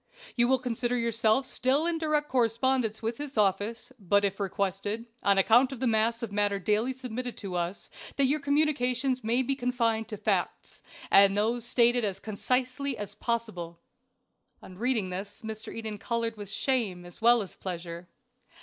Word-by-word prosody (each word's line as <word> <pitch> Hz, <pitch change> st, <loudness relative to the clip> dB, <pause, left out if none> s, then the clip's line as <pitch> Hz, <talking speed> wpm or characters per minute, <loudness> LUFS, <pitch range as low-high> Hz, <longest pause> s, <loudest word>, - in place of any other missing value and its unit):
You 240 Hz, -1 st, +3 dB
will 265 Hz, +1 st, +4 dB
consider 245 Hz, 0 st, -1 dB
yourself 230 Hz, +2 st, +2 dB
still 265 Hz, +4 st, +1 dB
in 340 Hz, -1 st, 0 dB
direct 305 Hz, -2 st, 0 dB
correspondence 235 Hz, -2 st, +1 dB
with 225 Hz, +1 st, -2 dB
this 290 Hz, -3 st, -5 dB
office, 210 Hz, +4 st, 0 dB
but 200 Hz, +1 st, +2 dB
it 195 Hz, -, +1 dB
is 195 Hz, -, -25 dB
requested, 200 Hz, +3 st, -2 dB, 0.2 s
on 200 Hz, -1 st, +3 dB
account 235 Hz, +7 st, +5 dB
of 265 Hz, -, -7 dB
the 260 Hz, -, -1 dB
mass 230 Hz, +1 st, +2 dB
of 225 Hz, -, -4 dB
matter 205 Hz, 0 st, +1 dB
daily 210 Hz, +6 st, +1 dB
submitted 250 Hz, -1 st, -5 dB
to 195 Hz, -4 st, -6 dB
us, 175 Hz, +2 st, -3 dB, 0.2 s
that 280 Hz, -, +3 dB
your 290 Hz, +4 st, +1 dB
communications 275 Hz, -3 st, +1 dB
may 235 Hz, +4 st, +2 dB
be 275 Hz, -, 0 dB
confined 235 Hz, -4 st, 0 dB
to 210 Hz, -, -6 dB
facts, -, -, -2 dB, 0.3 s
and 195 Hz, 0 st, +6 dB
those 230 Hz, +3 st, 0 dB
stated 240 Hz, 0 st, +3 dB
as 200 Hz, -3 st, -2 dB
concisely 255 Hz, +5 st, -1 dB
as 205 Hz, -, -5 dB
possible." 215 Hz, -8 st, -3 dB, 0.8 s
On 185 Hz, -, -11 dB
reading 220 Hz, -3 st, 0 dB
this 200 Hz, +4 st, -6 dB
Mr. 220 Hz, 0 st, -6 dB
Eden 220 Hz, -2 st, -6 dB
colored 230 Hz, 0 st, -2 dB
with 205 Hz, -2 st, -8 dB
shame 215 Hz, -7 st, -1 dB
as 175 Hz, +3 st, -13 dB
well 235 Hz, -1 st, +5 dB
as 190 Hz, -, -11 dB
pleasure. 175 Hz, -1 st, -6 dB
230 Hz, 170 wpm, -28 LUFS, 205-255 Hz, 0.8 s, and